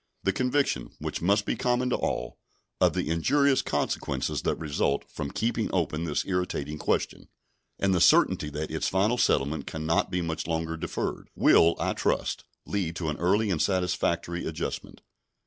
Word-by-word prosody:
The 95 - +2
conviction, 130 +6 0
which - - -4
must 100 +4 +2
be - - 0
common 125 0 0
to - - +3
all, - - -3 0.4
of - - +4
the - - -1
injurious 135 - +3
consequences 70 - -2
that - - 0
result 75 -2 -1
from 70 - -5
keeping 115 +4 -1
open 85 -2 -1
this 75 -3 -1
irritating 85 -5 -2
question, - - -1 0.5
and 95 -1 +1
the 90 - +2
certainty 75 - +4
that 75 +2 -4
its 80 - -1
final 105 +6 +1
settlement 70 +1 +1
can 80 -1 -5
not 80 +1 +2
be 90 -1 -1
much 80 -1 -3
longer 80 0 -1
deferred, 85 0 -4
will, 85 +1 +5
I - - 0
trust, - - -1 0.2
lead 90 -5 -2
to 80 -2 -2
an 75 - -3
early 100 +4 +2
and 80 - 0
satisfactory 90 -2 0
adjustment. 80 0 -5
85 Hz, 165 wpm, -27 LUFS, 80-100 Hz, 0.5 s, will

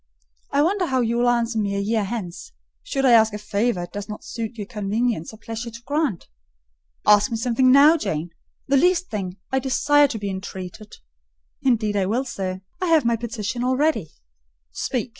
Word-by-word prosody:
I 285 - +3
wonder 370 +2 +1
how 260 -3 +1
you 235 0 0
will 245 0 +3
answer 235 -1 +1
me 200 -1 -1
a - - 0
year 215 +2 0
hence, 210 - -6 0.3
should 275 - -2
I 255 - +6
ask 220 -2 +5
a - - -3
favour 210 -1 -1
it 175 - -9
does 205 +1 -6
not 210 - -7
suit 230 0 -5
your 205 - -4
convenience 210 -3 -2
or 220 - -13
pleasure 225 +2 -6
to 235 +1 -11
grant." 285 - -1 0.8
"Ask 210 +4 +5
me 230 - -2
something 250 +2 +3
now, 290 +5 +7
Janet,—the 170 - -3
least 360 +4 +2
thing: 190 -3 -4
I 265 - +2
desire 290 +3 +3
to 240 - -5
be 200 -2 -3
entreated—" 190 +1 -8 0.7
"Indeed 220 -5 +1
I 195 -2 +1
will, 240 +6 0
sir; 190 -6 -4 0.2
I 365 - 0
have 320 -5 +4
my 235 0 +3
petition 230 0 -4
all 255 +1 +1
ready." 285 - +1 0.6
"Speak! - - -2
230 Hz, 190 wpm, -23 LUFS, 205-260 Hz, 0.8 s, now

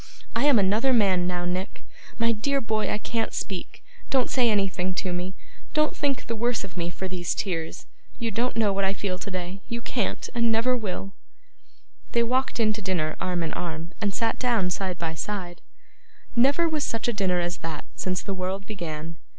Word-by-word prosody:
I 235 +4 +3
am 285 -4 +7
another 215 +7 +4
man 190 -6 +4
now, 175 -1 -1
Nick. 180 +2 -3 0.3
My 230 0 +4
dear 275 +6 +1
boy, 220 -3 0
I - - +1
can't 225 +1 -1
speak. 190 -3 -4 0.3
Don't 260 -3 +3
say 245 -3 +4
anything 190 -3 +1
to 185 0 -1
me. 180 +2 -3 0.4
Don't 305 0 +3
think 280 -2 0
the 230 - -2
worse 235 0 +1
of 195 - -8
me 170 -1 -1
for 190 +2 -4
these 180 -2 -1
tears. 165 -5 -2 0.3
You 230 -1 -1
don't 240 +4 0
know 215 -3 +3
what 195 0 +1
I 195 +1 +2
feel 185 -2 -2
today; 185 -1 -4
you 235 -1 -2
can't, 235 -2 -1
and 235 -2 +3
never 230 +3 +3
will!' 195 -4 -3 1.0
They 235 - +4
walked 255 +2 +1
in 215 -1 +4
to 215 - -5
dinner 175 -5 0
arm 180 -2 0
in 160 - -2
arm, 165 0 -4
and 205 -2 +2
sat 225 +3 0
down 230 -8 +2
side 185 -1 -1
by 165 -2 -2
side. 175 +1 -4 0.7
Never 275 +8 +5
was 310 -2 0
such 230 0 -1
a 240 - +2
dinner 190 -4 +2
as 175 0 -1
that, 160 -2 -5
since 185 -1 -1
the 200 - -2
world 190 +1 -2
began. 165 -5 -5
195 Hz, 195 wpm, -27 LUFS, 180-230 Hz, 1.0 s, am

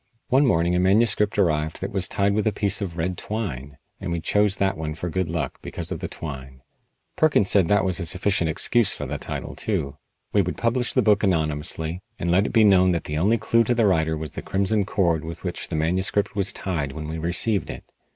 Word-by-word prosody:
One 135 +2 +4
morning 85 -5 +2
a - - +2
manuscript 105 +2 +2
arrived 80 -5 +1
that 95 - -4
was 95 -2 0
tied 100 0 +1
with 110 +1 0
a - - +3
piece 100 0 0
of 90 -4 -4
red 90 +2 -2
twine, 70 - -5 0.2
and 90 - -4
we 85 - -1
chose 105 +4 +1
that 95 0 +1
one 75 -2 -4
for 85 +1 -4
good 95 -2 -1
luck 80 -2 -3
because - - -5
of - - -3
the - - -4
twine. 65 -4 -8 0.5
Perkins 145 -11 +3
said 95 -5 +4
that 105 +2 +3
was 95 -1 0
a 85 - -2
sufficient 90 -1 +1
excuse 115 +7 +2
for - - -5
the - - -4
title, - - -5
too. 70 +1 -3 0.4
We 100 - +4
would 90 -1 -3
publish 120 +1 0
the 130 - +3
book 105 -1 +4
anonymously, 80 -1 -1 0.2
and 85 - -1
let 95 +4 +3
it - - -4
be 115 - +4
known 95 -3 +5
that 85 - -2
the 75 0 -3
only 105 +7 +3
clue 115 +1 +2
to 120 +2 0
the 115 -2 +3
writer 80 -5 +2
was 75 -1 -5
the - - -6
crimson 100 +1 0
cord 85 -6 +1
with 80 0 -8
which - - -3
the - - -4
manuscript 95 +6 0
was 100 -2 +2
tied 75 -8 -3
when 75 +1 -6
we 80 +1 -4
received 90 +6 0
it. - - -9
95 Hz, 230 wpm, -24 LUFS, 80-105 Hz, 0.5 s, known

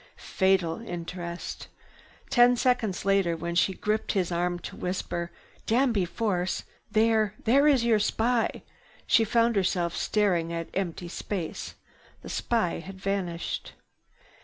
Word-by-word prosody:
Fatal 190 -2 +1
interest. 175 -3 -6 0.6
Ten 245 0 +6
seconds 235 -7 0
later, 195 -4 +2
when 170 +1 -4
she 185 +2 +2
gripped 215 +1 -1
his 185 -4 0
arm 175 +1 0
to - - -8
whisper, 175 -1 -3 0.4
"Danby 230 -5 +2
Force! 180 0 -1 0.3
There—there 220 +5 +3
is 265 -5 +4
your 225 -2 +4
spy!" 230 +3 0 0.4
she 225 - +4
found 230 +1 +2
herself 180 -3 +1
staring 180 -6 +1
at 165 -1 -4
empty 180 -2 -3
space. 175 -1 -5 0.5
The - - -8
spy 225 -8 0
had 190 +3 -10
vanished. 190 -4 -3
195 Hz, 120 wpm, -27 LUFS, 175-225 Hz, 0.6 s, Ten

